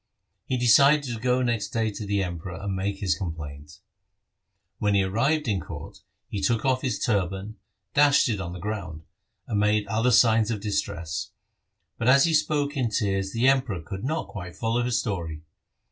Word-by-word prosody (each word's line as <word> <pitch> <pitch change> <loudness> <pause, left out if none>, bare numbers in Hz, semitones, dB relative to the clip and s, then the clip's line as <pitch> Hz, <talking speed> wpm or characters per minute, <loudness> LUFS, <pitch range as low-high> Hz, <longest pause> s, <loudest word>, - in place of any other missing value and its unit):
He 130 - 0
decided 140 +5 +5
to 120 -4 -4
go 125 +2 +1
next 115 -4 0
day 110 -1 -1
to 105 0 -7
the 100 -1 +1
Emperor, 90 0 -5
and 100 -1 -3
make 100 +1 -2
his 95 -2 +1
complaint. 75 -5 -7 1.0
When 105 -1 +1
he 100 - +4
arrived 135 +10 +1
in 100 -4 +1
court - - -9 0.3
he 100 - -4
took 115 +5 +1
off 130 -1 +2
his 130 - -1
turban, 100 -1 -1 0.4
dashed 145 0 +5
it 105 -5 -1
on 85 -2 -5
the 90 - -7
ground, 90 -6 -5 0.4
and 105 - -1
made 105 0 +2
other 115 +4 +1
signs 115 -2 +4
of 110 -3 -2
distress, 85 -6 -3 0.7
but 115 - -1
as 135 +2 +7
he 165 - +2
spoke 150 -1 +1
in 125 -4 0
tears 95 -3 -1
the 115 +3 +2
Emperor 130 -8 +2
could 95 +5 -7
not 155 +5 -2
quite 90 -5 -8
follow 115 +1 0
his 120 -1 +1
story. 85 -8 -4
105 Hz, 180 wpm, -26 LUFS, 95-125 Hz, 1.0 s, as